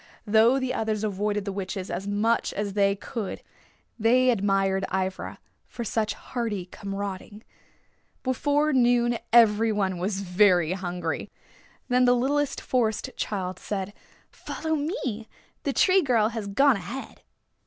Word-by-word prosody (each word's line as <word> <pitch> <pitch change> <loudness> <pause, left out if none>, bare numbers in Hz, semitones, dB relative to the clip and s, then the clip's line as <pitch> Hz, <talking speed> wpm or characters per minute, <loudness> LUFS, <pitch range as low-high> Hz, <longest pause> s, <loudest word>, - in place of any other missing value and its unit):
Though 225 +5 +4
the 260 -1 -2
others 220 -1 -1
avoided 205 0 -1
the 200 - -2
witches 190 -1 -5
as 195 +2 -4
much 215 +3 +1
as 205 -1 -3
they 200 -1 +3
could 205 0 -6 0.6
they 250 +3 +4
admired 195 -3 +1
Ivra 190 0 -2 0.3
for 235 - -6
such 220 -1 -1
hardy 225 -7 -4
comrading. 200 +2 -6 0.8
Before 290 +3 +1
noon 240 -2 +3
every 225 -1 +5
one 190 -4 -1
was 195 +2 -2
very 180 -3 +3
hungry. 180 -2 -3 0.6
Then 250 0 +3
the 245 0 +5
littlest 280 +3 0
Forest 225 -4 0
Child 185 -3 -3
said, 200 -1 -4 0.4
"Follow 315 0 -4
me. 285 - -3 0.4
The 280 - +1
Tree 380 +5 +4
Girl 230 -8 +2
has 225 -3 -5
gone 270 +5 +4
ahead." 200 +9 -8
215 Hz, 130 wpm, -26 LUFS, 195-245 Hz, 0.8 s, every